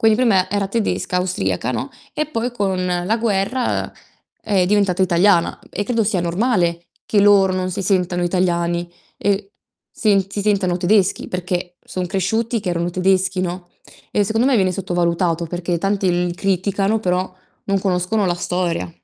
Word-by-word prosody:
Quindi 220 -1 +5
prima 195 -7 +3
era 200 -1 -1
tedesca, 205 -4 -1
austriaca 125 - -1
no, 125 - -3 0.2
e 305 - -1
poi 245 -4 -3
con 190 -5 -1 0.2
la 220 +5 +1
guerra, 225 +3 0
uhm, - - -8 0.5
è 195 -4 +1
diventata 195 -2 +2
italiana 175 0 +3
e 205 - -3
credo 230 0 0
sia 195 -4 +1
normale 175 -2 0 0.2
che 210 - +2
loro 200 -2 +5
non 185 0 -1
si 190 +2 -3
sentano 180 -2 +1
italiani, 175 -1 0 0.3
ehm, 200 -1 +1 0.5
sen 200 -4 +2
si 205 - -2
sentano 195 -4 +1
tedeschi 190 +1 +2
perché, 180 0 -3
son 185 -1 -4
cresciuti 215 +5 -1
che 185 - -3
erano 170 0 -1
tedeschi, 185 +1 +1
no, 180 0 -4 0.4
e 205 - +1
secondo 225 +5 +1
me 275 - +3
viene 190 -4 +2
sottovalutato, 175 -2 0
perché 175 +1 -2
tanti 195 +1 0 0.2
li 175 - -3
criticano 195 +3 0
però, 185 -1 -1 0.3
non 195 0 +1
conoscono 190 +2 0
la 175 -1 +1
storia. 175 - -2
185 Hz, 160 wpm, -20 LUFS, 175-205 Hz, 0.5 s, Quindi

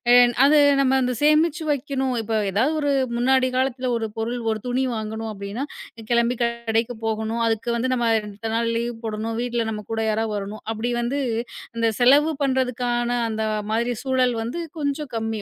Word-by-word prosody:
என் 245 -1 +6
அது 295 +2 +6 0.2
நம்ம 265 0 +3
அந்தச் 250 -2 -1
சேமிச்சு 310 +1 +3
வைக்கணும், 270 -2 -1
இப்போ 220 0 -2 0.2
ஏதாது 230 +10 +2
ஒரு 290 -1 +1 0.3
முன்னாடி 260 +1 +3
காலத்துல 260 -1 0
ஒரு 225 -1 -2
பொருள், 235 +2 -2
ஒரு 215 -1 -3
துணி 255 +2 0
வாங்கணும் 220 0 -4
அப்படின்னா 200 +6 -5 0.5
கெளம்பி 235 0 +2
கடைக்கு 235 0 -1
போகணும், 220 +1 -1
அதுக்கு 225 +2 -1
வந்து 255 +2 0
நம்ம 235 -2 +1
2 210 +1 -6
நாள் 230 0 +1
லீவ் 235 0 -2
போடணும், 220 +1 -3
வீட்ல 240 -1 -1
நம்ம 210 -1 -5
கூட 225 - -1
யாரா 220 +1 0
வரணும், 205 +1 -5
அப்படி 230 +2 -2
வந்து 255 +4 -1 0.6
அந்தச் 230 -2 0
செலவு 290 +6 +5
பண்றதுக்கான, 250 -2 0 0.2
அந்த 220 0 -2 0.3
மாதிரி 235 +2 +1
சூழல் 255 -2 +2
வந்து 245 +9 -4 0.2
கொஞ்சம் 285 0 -2
கம்மி, 225 -1 -2
235 Hz, 165 wpm, -23 LUFS, 225-260 Hz, 0.6 s, என்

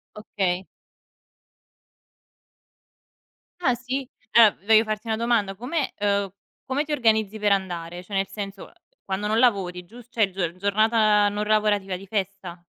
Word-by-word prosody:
Okay. 190 -3 -2 2.9
Ah 260 -8 +2
si? 255 +2 -4 0.3
Allora 225 -4 +7
voglio 220 0 +6
farti 215 +1 -4
una 220 - 0
domanda. 225 -4 0
Come 265 - -3
uhm, 200 -2 0 0.3
come 270 +3 -1
ti 305 - -8
organizzi 220 -5 +1
per 205 -1 +2
andare? 175 -2 -2
Cioè 200 - -13
nel 195 0 0
senso, 200 -1 -7
uhm, - - -18 0.3
quando 195 +2 -3
non 220 +1 +1
lavori, 195 -7 +1
gius 235 +4 -14
cioè 215 -5 +1
gior 175 -3 -3
giornata 210 +1 +3
non 205 +1 -2
lavorativa 210 -3 +1
di 195 - -12
festa? 195 -3 -4
210 Hz, 140 wpm, -24 LUFS, 195-225 Hz, 2.9 s, Allora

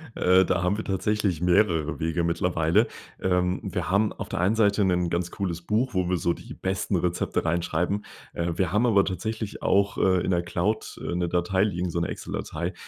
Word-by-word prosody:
Äh, 95 +1 +4
da 90 - 0
haben 90 +3 +1
wir 110 - -4
tatsächlich 100 -3 0
mehrere 85 -3 +2
Wege 80 +1 0
mittlerweile. 85 +4 +2 0.3
Ähm, 90 0 +1
wir - - -3
haben 100 +3 +2
auf - - -7
der 95 - -3
einen 95 +5 +2
Seite 105 -2 +3
'nen 90 -2 +1
ganz 85 0 -2
cooles 90 -4 -3
Buch, 110 +8 0
wo 90 -2 0
wir 90 - +1
so 85 0 +1
die - - -10
besten 95 +1 -2
Rezepte 90 -1 -1
reinschreiben. 85 +4 0 0.3
Äh, 85 0 -2
wir 90 -4 0
haben 105 +5 +2
aber 100 -4 +4
tatsächlich 110 +2 -4
auch, 100 +1 +2
äh, 95 -2 +3
in - - 0
der 85 -1 +1
Cloud, 90 +5 -2
äh, 85 - -3
'ne 90 -1 0
Datei 90 +2 +1
liegen, 90 -3 -1
so 85 - -2
'ne 85 - -1
Excel - - -6
Datei, - - -3
90 Hz, 205 wpm, -26 LUFS, 85-100 Hz, 0.3 s, Äh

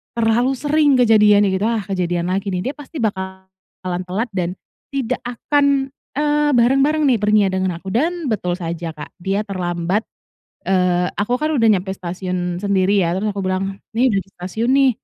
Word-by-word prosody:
terlalu 235 +3 +2
sering 295 0 +3
kejadiannya 210 -3 +5
gitu, 200 +3 0
"ah 230 -3 0
kejadian 180 -2 -1
lagi 195 +2 -1
nih, 190 +9 -2
dia - - -15
pasti 295 +1 -9
bakalan 190 -2 -5
telat 215 +7 -2
dan 180 -1 -2 0.4
tidak 255 -2 -1
akan, 275 +2 +1 0.2
eee, 295 0 +2
bareng-bareng 275 +6 +3
nih, 245 - +4
perginya 210 -1 +3
dengan 185 0 0
aku," 190 +2 -7
dan 315 - 0
betul 180 -4 -1
saja, 170 -1 -4
Kak, 150 - -9
dia 195 +4 -1
terlambat, 180 +1 -2 0.6
eee, 180 -1 +2
aku 240 +5 +1
kan 305 +1 0
udah 230 -6 +3
nyampe 190 -2 +2
stasiun 180 -1 -4
sendiri 200 0 +2
ya 170 - 0
terus 210 +3 -1
aku 200 - -4
bilang, 190 +1 -1 0.2
"ini 255 +3 +4
udah 195 - +2
di 195 - -26
stasiun 220 +7 -2
nih," 270 -1 +5
200 Hz, 170 wpm, -20 LUFS, 185-250 Hz, 0.6 s, kejadiannya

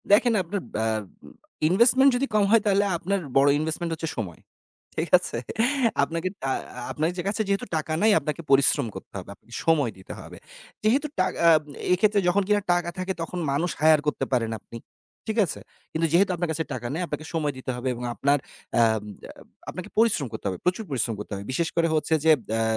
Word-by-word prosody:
দেখেন 230 +3 +5
আপনার 195 +4 -3 0.2
আ - - 0 0.8
ইনভেস্টমেন্ট 245 +8 +6
যদি 260 +3 +1
কম 210 - +4
হয় 230 -1 +6
তাহলে 200 -1 +3
আপনার 195 +4 -1 0.2
বড় 140 +1 +5
ইনভেস্টমেন্ট 160 +2 -2
হচ্ছে 160 0 -4
সময়। 95 -7 -5 0.6
ঠিক 165 +2 -1
আছে? 180 - -4 0.7
আপনাকে 165 +2 -2
টা 135 - -2 0.4
আপনার 155 +2 0 0.2
কাছে 210 +2 -1
যেহেতু 200 0 0
টাকা 155 0 -3
নেই 220 +1 +5
আপনাকে 155 +2 -4
পরিশ্রম 140 -1 +5
করতে 95 - -10
হবে, 95 - -8
আপনার 115 +3 -13
সময় 150 -7 +3
দিতে 95 - -10
হবে। - - -11 0.5
যেহেতু 265 +8 +2
টা 185 - +4 0.7
এক্ষেত্রে 205 +3 +3
যখন 195 +3 +3
কিনা 205 0 +3
টাকা 175 -1 0
থাকে 185 +1 -2
তখন 175 +2 -4
মানুষ 160 +6 0
হায়ার 155 -1 +6
করতে 150 - 0
পারেন 115 -3 +1
আপনি। 115 - -10 0.5
ঠিক 220 +1 -2
আছে? 165 - -5 0.3
কিন্তু 165 +1 +1
যেহেতু 185 +2 +4
আপনার 175 -1 -2
কাছে 160 +1 -1
টাকা 120 -1 -4
নেই 165 - -2
আপনাকে 155 0 -5
সময় 150 -3 0
দিতে 130 0 -4
হবে 125 +1 -4
এবং 120 0 -7
আপনার 140 +1 +2 0.4
আ - - +6 0.9
আপনাকে 185 +3 -7
পরিশ্রম 215 - +3
করতে 110 - -7
হবে। 95 - -4
প্রচুর 180 +5 +1
পরিশ্রম 120 -3 0
করতে 105 - -8
হবে। 100 - -6
বিশেষ 165 +5 0
করে 165 0 +3
হচ্ছে 155 +1 0
যে 160 - +7 0.3
আ - - +1
165 Hz, 185 wpm, -25 LUFS, 140-195 Hz, 0.9 s, যে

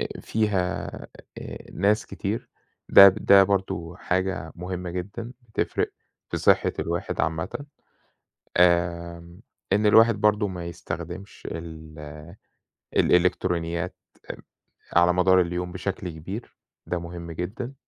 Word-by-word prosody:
آآ - - -2
فيها 100 -4 0 0.5
آآ، - - -7
ناس 100 +4 +2
كتير، - - -4 0.4
ده 100 - +10
ده 100 0 +6
برضه 90 -4 -2
حاجة 90 -4 -2
مُهمة 90 0 -5
جدًا، 100 +7 -5 0.2
بتفرِق 110 - -1 0.4
في - - -2
صحة - - +3
الواحد 85 +1 -2
عامًة. 80 - -2 0.9
آمم، 85 0 +1 0.3
إن 105 +2 +3
الواحد 110 +2 +6
برضه 105 0 +2
ما 90 -3 -6
يستخدمش 85 +2 -7
ال 80 -2 -8 1.0
الإلكترونيات 90 -1 +1 0.3
آآ - - -4 0.6
على 85 +1 +5
مدار 90 +1 +5
اليوم 90 0 -2
بشكل 95 0 -4
كبير. 90 +8 -8 0.3
ده 90 - -1
مُهم 85 0 -7
جدًا. 100 - -5
90 Hz, 110 wpm, -25 LUFS, 85-100 Hz, 1.0 s, ده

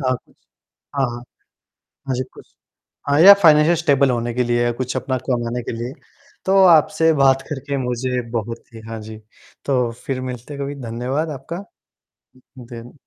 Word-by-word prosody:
हाँ, 130 -2 +1
कुछ - - -28 0.6
हाँ, 135 -2 +2
हाँ। 120 - -6 0.9
हाँ 130 - 0
जी, 125 - -1
कुछ - - -17 0.6
हाँ, 145 - +3
या 200 +3 +11
फाइनेंशियल 155 0 +6
स्टेबल 140 -5 +2
होने 120 -1 -2
के 125 +1 +1
लिए 120 0 +1
या 120 - +1
कुछ 125 +2 -4
अपना 130 +1 -2
कमाने 120 -1 -1
के - - -5
लिए। 120 +2 -4 0.5
तो 190 - +2
आपसे 160 -1 +5
बात 135 -2 +3
करके 140 -1 -4
मुझे 125 0 -2
बहुत 115 0 -4
ही 115 - -10
हाँ 115 0 -6
जी। 110 +1 -9 0.5
तो 125 -4 +1
फिर 130 -2 -3
मिलते 125 +2 -7
हैं 140 - -6
कभी, 140 +1 -5
धन्यवाद 125 +7 -3
आपका। 170 +8 -7 1.0
दिन 120 -1 -10
130 Hz, 170 wpm, -20 LUFS, 120-140 Hz, 1.0 s, या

